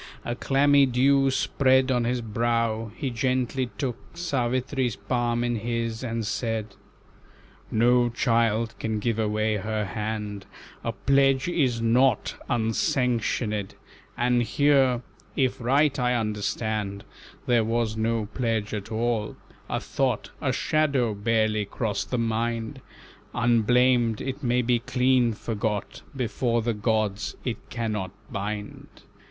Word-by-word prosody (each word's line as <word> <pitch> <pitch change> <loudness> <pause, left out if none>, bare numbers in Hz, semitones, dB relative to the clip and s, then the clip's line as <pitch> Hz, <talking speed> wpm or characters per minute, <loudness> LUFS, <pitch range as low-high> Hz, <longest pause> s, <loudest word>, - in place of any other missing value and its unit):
A 120 - -1
clammy 140 +2 +4
dew 135 +2 +3
Spread 130 0 +2
on 120 -2 +1
his 125 +1 0
brow, 115 0 -1
he 135 -5 -3
gently 125 +1 0
took 130 -5 -2 0.2
Savitri's 130 -5 -1
palm 120 -1 -1
in 120 -1 0
his, 115 +1 -3
and 115 -2 -2
said: 110 -1 -2 1.0
"No 120 +2 +3
child 115 -1 +1
can 110 -1 -1
give 115 +1 -1
away 110 0 +1
her 110 +1 -2
hand, 105 0 -4 0.4
A - - -1
pledge 135 0 +2
is 130 -10 +1
nought 125 +3 +3 0.2
unsanctionèd; 115 -2 0 0.4
And 120 0 +2
here, 130 0 +3 0.3
if 130 -1 0
right 140 +4 +2
I 125 0 +2
understand, 105 -2 -2 0.4
There 120 -2 +3
was 115 0 0
no 110 0 0
pledge 115 -4 -1
at 105 0 -5
all, 110 -1 -1 0.3
a - - -1
thought, - - -1
A - - +1
shadow, 140 -7 +1
barely 110 0 +1
crossed 105 +1 -3
the 125 - -1
mind 115 0 -2 0.5
Unblamed, 120 0 +3
it 135 +2 -4
may 125 -1 +1
be 120 0 +2
clean 125 -1 +2
forgot, 105 -1 -3
Before 120 -2 0
the 120 0 0
gods 105 -2 -1
it 120 -3 -4
cannot 110 -6 -2 0.2
bind. 105 +1 -5
115 Hz, 125 wpm, -26 LUFS, 110-125 Hz, 1.0 s, clammy